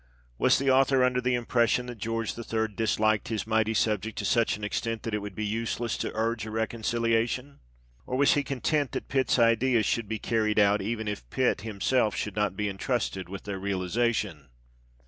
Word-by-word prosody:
Was -, -, +4 dB
the 135 Hz, 0 st, +2 dB
author 135 Hz, 0 st, +4 dB
under 125 Hz, 0 st, +2 dB
the 125 Hz, 0 st, +1 dB
impression 120 Hz, 0 st, +1 dB
that 120 Hz, -2 st, -8 dB
George 115 Hz, +1 st, -2 dB
III. 110 Hz, -1 st, -2 dB
disliked 110 Hz, 0 st, +1 dB
his 110 Hz, -2 st, -2 dB
mighty 110 Hz, 0 st, +1 dB
subject 110 Hz, 0 st, 0 dB
to -, -, -2 dB
such 115 Hz, -3 st, +2 dB
an 105 Hz, -, -11 dB
extent 115 Hz, +2 st, -2 dB
that 115 Hz, -, -4 dB
it 105 Hz, -, +1 dB
would 100 Hz, -2 st, -7 dB
be 110 Hz, -, -2 dB
useless 115 Hz, +2 st, -2 dB
to -, -, -2 dB
urge 115 Hz, 0 st, -1 dB
a 110 Hz, -, -5 dB
reconciliation? 115 Hz, +4 st, -1 dB, 0.5 s
Or 130 Hz, -, -1 dB
was 140 Hz, +1 st, +5 dB
he 145 Hz, -, +2 dB
content 140 Hz, +1 st, -1 dB
that -, -, -4 dB
Pitt's 130 Hz, -1 st, +2 dB
ideas 115 Hz, 0 st, +3 dB
should 115 Hz, -3 st, 0 dB
be 110 Hz, -, -1 dB
carried 110 Hz, -1 st, 0 dB
out, 105 Hz, 0 st, +4 dB
even 110 Hz, +2 st, -3 dB
if 100 Hz, -13 st, -5 dB
Pitt -, -, +1 dB
himself 110 Hz, +2 st, 0 dB
should 105 Hz, -, -3 dB
not 105 Hz, -2 st, 0 dB
be 105 Hz, -, 0 dB
entrusted 95 Hz, -3 st, -2 dB
with 100 Hz, 0 st, -7 dB
their 100 Hz, -2 st, -5 dB
realization 95 Hz, -, -1 dB
110 Hz, 190 wpm, -28 LUFS, 105-120 Hz, 0.5 s, was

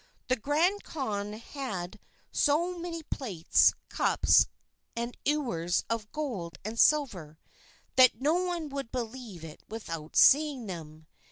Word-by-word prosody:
The 255 Hz, -, +4 dB
Grand 315 Hz, -, +1 dB
Khan 210 Hz, -8 st, -3 dB
had 215 Hz, -5 st, -6 dB, 0.3 s
so 335 Hz, +5 st, +2 dB
many 335 Hz, -1 st, -5 dB
plates, 200 Hz, -, +2 dB
cups, -, -, +4 dB, 0.5 s
and 235 Hz, +1 st, -3 dB
ewers 235 Hz, -, 0 dB
of 220 Hz, -2 st, -3 dB
gold 200 Hz, -, -4 dB
and 225 Hz, +2 st, -4 dB
silver, 195 Hz, -, +2 dB, 0.6 s
that 255 Hz, -4 st, +6 dB
no 290 Hz, +4 st, +2 dB
one 350 Hz, -3 st, -1 dB
would 275 Hz, -4 st, -5 dB
believe 230 Hz, -7 st, -6 dB
it 155 Hz, -1 st, -11 dB
without 165 Hz, -8 st, -7 dB
seeing 285 Hz, -4 st, +5 dB
them. 160 Hz, -4 st, -8 dB
240 Hz, 120 wpm, -29 LUFS, 190-295 Hz, 0.6 s, that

